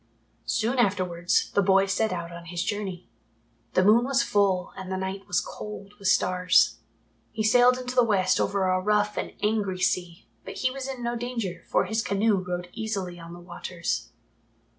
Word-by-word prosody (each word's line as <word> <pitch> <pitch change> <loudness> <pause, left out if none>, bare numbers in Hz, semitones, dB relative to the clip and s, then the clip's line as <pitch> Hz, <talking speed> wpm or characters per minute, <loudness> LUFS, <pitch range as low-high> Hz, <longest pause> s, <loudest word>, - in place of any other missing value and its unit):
Soon 235 +4 0
afterwards, 185 -5 +1
the 200 - +4
boy 195 0 +4
set 210 +3 0
out 170 -1 -4
on 170 0 -9
his 175 +1 -3
journey. 195 -4 -4 0.7
The 185 - +4
moon 220 +5 +6
was 270 +1 +2
full 195 -5 +1
and 190 -1 -7
the 190 - -1
night 190 +1 -5
was 180 - +2
cold 210 -1 -8
with 200 - -3
stars. 180 0 +3 0.5
He 215 - -2
sailed 245 +3 +5
into 250 0 -5
the 250 -1 +5
West 195 -5 +2
over 195 -1 +1
a 185 0 +1
rough 210 +1 +1
and - - -4
angry 210 -3 0
sea, 180 -2 -1 0.2
but - - -8
he 255 - 0
was 270 0 -5
in 260 -3 -6
no 235 0 -1
danger, 235 -6 -4
for - - +2
his 220 +4 -1
canoe 205 0 +2
rode 180 -1 -4
easily 200 -6 -4
on 170 0 -10
the 175 - -10
waters. 175 - -4
195 Hz, 185 wpm, -26 LUFS, 180-220 Hz, 0.7 s, moon